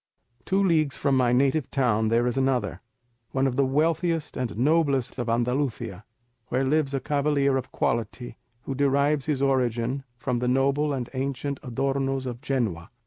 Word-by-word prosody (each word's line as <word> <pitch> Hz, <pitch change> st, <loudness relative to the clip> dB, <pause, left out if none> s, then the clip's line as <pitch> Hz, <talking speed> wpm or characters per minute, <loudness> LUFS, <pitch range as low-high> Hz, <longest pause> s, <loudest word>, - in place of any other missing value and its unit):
"Two 195 Hz, +1 st, +2 dB
leagues 155 Hz, -6 st, +2 dB
from 140 Hz, -2 st, +1 dB
my 125 Hz, -2 st, +3 dB
native 135 Hz, +3 st, +2 dB
town 115 Hz, -5 st, +1 dB
there 115 Hz, +2 st, +2 dB
is 120 Hz, -1 st, 0 dB
another, 135 Hz, -2 st, 0 dB, 0.5 s
one 135 Hz, 0 st, +2 dB
of 130 Hz, -2 st, 0 dB
the 135 Hz, 0 st, +2 dB
wealthiest 160 Hz, +3 st, 0 dB
and 120 Hz, -5 st, -3 dB
noblest 140 Hz, -1 st, +1 dB
of 120 Hz, -1 st, -2 dB
Andalusia, 120 Hz, -4 st, -1 dB, 0.4 s
where 130 Hz, +2 st, 0 dB
lives 140 Hz, 0 st, +1 dB
a -, -, 0 dB
cavalier 140 Hz, 0 st, +1 dB
of 130 Hz, -1 st, -3 dB
quality, 115 Hz, +1 st, -2 dB, 0.3 s
who 135 Hz, -, -4 dB
derives 140 Hz, +1 st, +1 dB
his 140 Hz, -3 st, 0 dB
origin 130 Hz, -1 st, 0 dB
from 125 Hz, 0 st, -1 dB
the 125 Hz, -, -1 dB
noble 140 Hz, +3 st, +2 dB
and 130 Hz, -4 st, -2 dB
ancient 135 Hz, +1 st, -3 dB
Adornos 135 Hz, +1 st, -1 dB
of 120 Hz, -1 st, -5 dB
Genoa. 115 Hz, -, -2 dB
135 Hz, 160 wpm, -26 LUFS, 125-140 Hz, 0.5 s, my